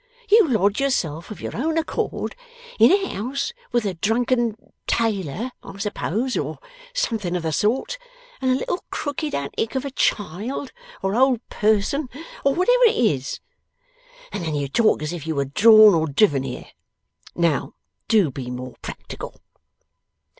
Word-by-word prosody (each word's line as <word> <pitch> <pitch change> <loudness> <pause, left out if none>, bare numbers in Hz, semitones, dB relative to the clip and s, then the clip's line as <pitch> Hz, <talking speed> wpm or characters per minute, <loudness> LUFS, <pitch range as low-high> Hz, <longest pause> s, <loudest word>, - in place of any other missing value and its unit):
You 430 -4 +7
lodge 205 -3 +2
yourself 170 - -1
of 215 - -8
your - - -5
own 315 +7 -1
accord 325 - -2 0.4
in - - +7
a 390 0 +2
house 275 - -3 0.2
with 240 -2 +1
a 195 - -1
drunken 230 +4 +1 0.3
tailor, 220 - -1
I - - -10
suppose 215 +4 -2
or - - -2 0.3
something 225 - -1
of 175 - -2
the 160 - -1
sort, 240 - 0 0.4
and 260 - +1
a 255 - +4
little 350 +7 -2
crooked 295 +1 -3
antic 140 - -3
of 265 +1 -1
a 280 - -4
child, 215 - -1 0.3
or 195 +1 0
old 255 -1 +2
person, 220 +7 +1 0.3
or 275 0 +3
whatever - - +4
it - - +1
is, 145 - 0 0.9
and 175 - -4
then 160 -2 -2
you 145 -1 -1
talk 215 - +2
as 155 +3 -3
if 160 -3 -6
you 160 - -1
were 140 0 0
drawn 215 +8 +7
or 160 -1 +2
driven 145 -1 +3
there. - - -9 0.6
Now, 170 -4 0 0.3
do 205 - +3
be 125 -1 -6
more 125 0 -7
practical. - - -8
215 Hz, 155 wpm, -23 LUFS, 165-265 Hz, 0.9 s, You